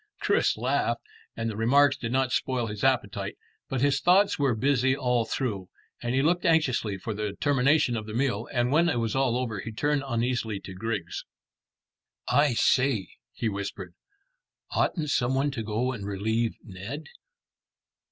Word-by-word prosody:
Chris - - +2
laughed, - - 0 0.3
and 115 - -2
the 110 - -3
remarks 135 +6 +4
did 115 - -5
not 130 0 +1
spoil 125 -2 0
his 105 -2 -6
appetite; 130 -6 0 0.3
but 130 -2 -1
his 140 -1 +3
thoughts 190 +1 +4
were 135 -4 +2
busy 130 +2 +2
all 125 -4 +1
through, 100 -9 -3 0.3
and 120 +1 -1
he 135 - +2
looked 175 +3 +2
anxiously 135 - +2
for 110 +4 -4
the 105 -1 -3
termination 140 -2 +3
of 110 -1 -4
the 105 - -6
meal, 120 -4 0
and 125 -1 +1
when 170 +4 +4
all 145 - 0
was 115 0 -1
over 125 -4 0
he 110 - -6
turned 145 +5 0
uneasily 120 -3 -1
to 95 - -9
Griggs. 95 -3 -4 1.0
"I 145 -4 +3
say," 125 -3 +2 0.2
he 115 - -3
whispered, 100 -3 -5 0.8
"oughtn't 150 -5 0
some 125 0 +1
one 140 +2 +1
to 130 -4 -4
go 110 +4 -1
and 110 -6 -6
relieve 110 +3 -1
Ned?" 105 +10 -7
120 Hz, 160 wpm, -27 LUFS, 110-135 Hz, 1.0 s, remarks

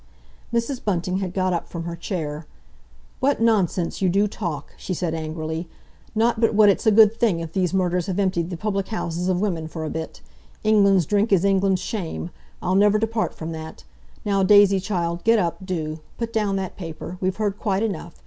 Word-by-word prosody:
Mrs. 235 +3 -1
Bunting 185 -2 0
had 190 -2 -2
got 185 -1 0
up 170 - -2
from 170 -1 -5
her 170 0 -4
chair. 160 -4 -4 0.7
"What 280 +2 +2
nonsense 200 -7 +1
you 190 - +3
do 200 +4 +3
talk!" 170 -9 -5
she 185 - -4
said 170 -1 -2
angrily. 160 +1 -4 0.5
"Not 230 +1 +2
but 225 -2 +3
what 210 -1 +7
it's 200 - +1
a - - +7
good 215 0 +7
thing 225 -7 +1
if 165 -1 -6
these 185 -3 +1
murders 180 -2 0
have 190 -1 -2
emptied 185 -4 0
the 175 - -5
public 195 +1 -2
houses 175 -5 -3
of 185 -1 +1
women 170 -6 -1
for 160 0 -5
a 155 - -4
bit. 160 0 -6 0.4
England's 200 -4 +4
drink 205 +5 +1
is 195 -1 +4
England's 195 -1 +2
shame—I'll 180 -2 -5
never 205 +2 +5
depart 225 0 -1
from 160 +1 -6
that! 160 - -8 0.4
Now, 200 -1 +2
Daisy, 200 0 +6
child, 175 -3 -2
get 230 0 +5
up, 180 -2 -1
do! 160 -4 -3 0.2
Put 230 -1 -4
down 210 -3 +1
that 190 -2 -4
paper. 170 0 -7
We've 185 0 0
heard 205 -2 -1
quite 200 -1 0
enough. 175 -6 -4
190 Hz, 195 wpm, -23 LUFS, 170-210 Hz, 0.7 s, what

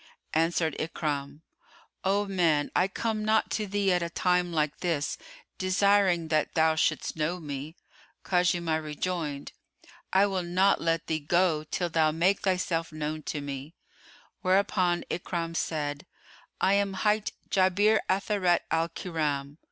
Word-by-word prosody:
Answered 165 -1 +1
Ikrimah, 145 -2 -3 0.6
"O 200 +2 +2
man 170 -7 +1
I 180 - +4
come 215 +2 -2
not 220 +1 +2
to 215 -2 -1
thee 200 -1 +1
at 180 - +1
a 170 - -2
time 180 0 +1
like 150 -2 -1
this 165 -5 -1 0.4
desiring 185 -3 +3
that 155 -1 0
thou 160 0 +4
shouldst 160 - 0
know 160 +3 -1
me." 145 0 -6 0.5
Khuzaymah 175 -3 +1
rejoined, 150 -2 -3 0.6
"I 190 +1 +5
will 195 -2 -1
not 185 +3 +2
let 165 0 0
thee 160 -1 -1
go 160 +1 +2
till 175 +2 -2
thou 160 -1 +3
make 175 +6 +2
thyself 180 -4 0
known 155 0 -4
to 150 - -3
me," 140 +3 -6 0.7
whereupon 185 -2 +2
Ikrimah 170 -1 -3
said 150 0 -2 0.5
"I 190 - +3
am 200 -1 +1
hight 210 0 +2 0.2
Jabir 200 +3 +4
Atharat 190 -2 +2
al 165 +1 +1
Kiram." 150 -5 -3
170 Hz, 135 wpm, -28 LUFS, 155-190 Hz, 0.7 s, I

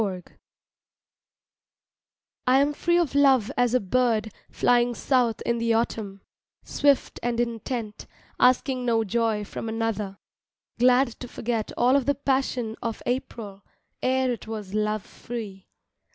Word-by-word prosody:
LOVE 185 -3 -3
FREE - - -23 2.1
I 255 +1 +5
AM 285 +1 +2
free 345 +3 +1
of 340 -6 +1
love 270 -6 +4
as 245 0 +2
a - - +5
bird 220 0 0 0.2
flying 240 0 +2
south 245 -4 +1
in 235 0 0
the 230 -1 +2
autumn, 205 -4 -2 0.4
Swift 285 -2 +1
and 240 -1 -1
intent, 230 -2 -3 0.3
asking 255 0 +3
no 230 -2 +2
joy 220 0 0
from 225 - -6
another, 220 -3 -2 0.6
Glad 250 +1 +5
to 250 - -7
forget 230 -2 -3
all 250 +2 +4
of 280 -2 +1
the 285 - +3
passion 260 -5 -1
of 230 -1 -4
April 230 -6 -4 0.4
Ere 260 0 +1
it 235 -2 -6
was 210 -3 -6
love 210 -1 0
free. 210 -5 -8
235 Hz, 140 wpm, -25 LUFS, 215-255 Hz, 2.1 s, I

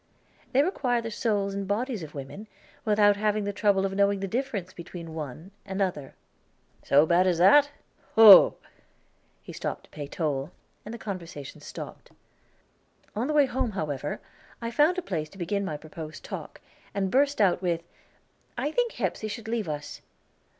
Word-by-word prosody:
"They 275 +2 +4
require 255 -8 0
the 230 -1 -5
souls 205 -4 0
and 200 -1 -4
bodies 225 +2 -1
of 155 -2 -9
women, 140 +10 -8 0.4
without 205 -1 +4
having 210 0 +1
the 205 0 -3
trouble 200 -2 +2
of 195 - -2
knowing 200 0 +2
the 195 - -3
difference 220 -5 -3
between 170 0 -9
the 165 - -9
one 155 +3 -7
and 195 0 -5
other." 175 -8 -2 0.7
"So 145 +3 +5
bad 175 +3 +3
as 175 -2 +2
that? 275 - +6 0.5
Whoa!" 215 -4 +10 0.9
He - - -10
stopped - - -4
to - - -21
pay 145 -2 -6
toll, 145 -2 -2 0.3
and 215 - -8
the 235 - -6
conversation 175 - -7
stopped. - - -9 1.0
On 230 +5 -1
the 305 - -1
way 295 -2 +5
home, 255 -3 -2
however, 150 -6 -3 0.4
I 230 0 -4
found 300 +9 +3
a 365 - -2
place 155 - -3
to 195 - -16
begin 200 +3 -1
my 155 -6 -3
proposed 155 0 -9
talk, - - -8 0.3
and 195 -1 0
burst 280 +1 +2
out 190 -4 +3
with, 170 -2 -1 0.7
"I 295 - -1
think 480 +6 0
Hepsey 215 - -2
should 220 +1 -6
leave 225 -6 -2
us." 150 -1 -6
200 Hz, 170 wpm, -27 LUFS, 165-225 Hz, 1.0 s, Whoa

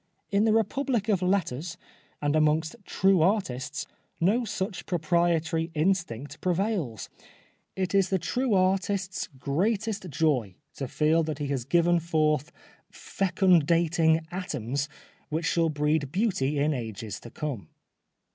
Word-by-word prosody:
In 200 +2 +3
the 220 - +4
Republic 225 +1 +1
of 195 -4 +2
Letters 180 -3 -1 0.5
and 145 +1 +2
amongst 155 +2 +2
true 190 -2 +3
artists 165 - 0 0.3
no 210 +9 +2
such 195 -2 -4
proprietary 165 -1 +1
instinct 155 -5 -1
prevails. 180 - -1 0.7
It 185 -1 -2
is 195 -2 +3
the 190 - +2
true 235 +7 0
artist's 190 0 0
greatest 195 - -1
joy 135 - 0 0.2
to 135 - -3
feel 155 +5 +2
that 155 -3 -3
he 145 -2 -3
has 135 -4 -2
given 170 +4 +3
forth 155 -2 +1 0.4
fecundating 170 -3 +2
atoms 140 - -3 0.4
which 160 +2 -2
shall 165 -1 +2
breed 150 -1 0
beauty 175 - 0
in 150 +2 +2
ages 110 -5 -5
to 120 - -11
come. 120 - -5
165 Hz, 125 wpm, -27 LUFS, 145-190 Hz, 0.7 s, the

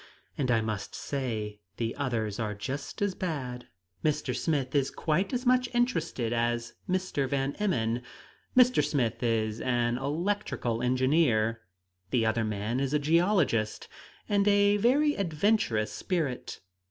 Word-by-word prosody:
And 130 -3 -1
I 115 -2 +3
must 110 -3 -4
say 110 -7 -3 0.2
the 115 -1 -2
others 115 -6 -2
are 105 -2 -2
just 140 - -4
as 200 -2 +1
bad. 130 -10 -4 0.4
"Mr. 145 -4 0
Smith 130 0 -1
is 140 -2 +2
quite 175 +5 0
as 250 0 -2
much 250 0 +3
interested 165 - 0
as 120 0 -1 0.2
Mr. 180 -7 0
Van 135 0 0
Emmon. 120 - 0 0.6
Mr. 250 0 +6
Smith 125 -6 0
is 110 -2 0
an 120 -1 +1
electrical 150 - -1
engineer; 125 -3 +2 0.5
the 120 -3 +2
other 110 +1 +1
man 110 +3 -2
is 135 +1 0
a - - +6
geologist, 155 - +2 0.4
and 200 -1 +2
a 205 0 +5
very 280 +8 +3
adventurous 165 - +1
spirit. 150 - -3
135 Hz, 135 wpm, -29 LUFS, 115-180 Hz, 0.6 s, Mr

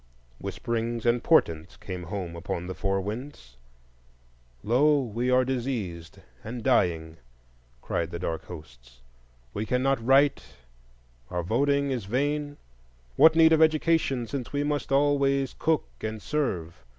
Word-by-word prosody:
Whisperings 115 0 -3
and 120 0 +2
portents 80 - +2
came 90 -1 -7
home 90 -2 -5
upon 85 +1 -4
the 95 - -5
four 95 +1 -1
winds: 105 - -7 1.1
Lo! 145 +6 +3
we 120 -1 -2
are 125 0 +4
diseased 115 -11 -4 0.3
and 115 +1 -6
dying, 80 -4 +1 0.7
cried 85 0 -2
the 85 - -5
dark 85 -2 -4
hosts; - - -13 0.5
we 105 - -2
cannot 125 +2 0
write, 135 +3 +4 0.9
our 90 0 -2
voting 140 +8 +1
is 120 -6 -3
vain; 145 +6 -1 0.6
what 160 0 +6
need 160 0 +6
of 160 - +4
education, 155 -5 +2
since 130 +1 -5
we 145 0 -1
must 145 -2 -2
always 140 -1 +2
cook 160 0 +1
and 110 0 -4
serve? 90 - -3
120 Hz, 130 wpm, -27 LUFS, 90-140 Hz, 1.1 s, what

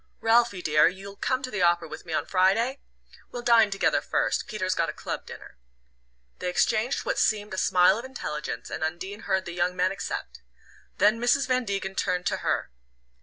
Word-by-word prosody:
"Ralphie, 225 -4 +2
dear, 150 0 +5
you'll 195 +2 -6
come 255 +5 -1
to 255 - -4
the 195 - -2
opera 175 -1 +3
with 160 - -10
me 165 - -4
on 155 - 0
Friday? 200 - +2 0.5
We'll 245 - -7
dine 230 -3 +5
together 195 0 +1
first - - -1
Peter's 185 -4 -1
got 165 -2 0
a - - -4
club - - -6
dinner." - - -11 0.8
They 180 - -2
exchanged 220 +7 +1
what - - -1
seemed 210 -2 +1
a - - -4
smile 180 +4 +4
of 240 - -7
intelligence, 150 - -5
and - - -4
Undine 190 +6 -4
heard 190 -1 +1
the 175 - -6
young 175 +1 0
man 185 +1 +1
accept. 195 -4 -5 0.6
Then 210 +3 +4
Mrs. 245 +3 +3
Van 255 -1 +1
Degen 195 -2 -3
turned 180 -2 -1
to - - 0
her. - - -2
195 Hz, 190 wpm, -26 LUFS, 180-230 Hz, 0.8 s, dear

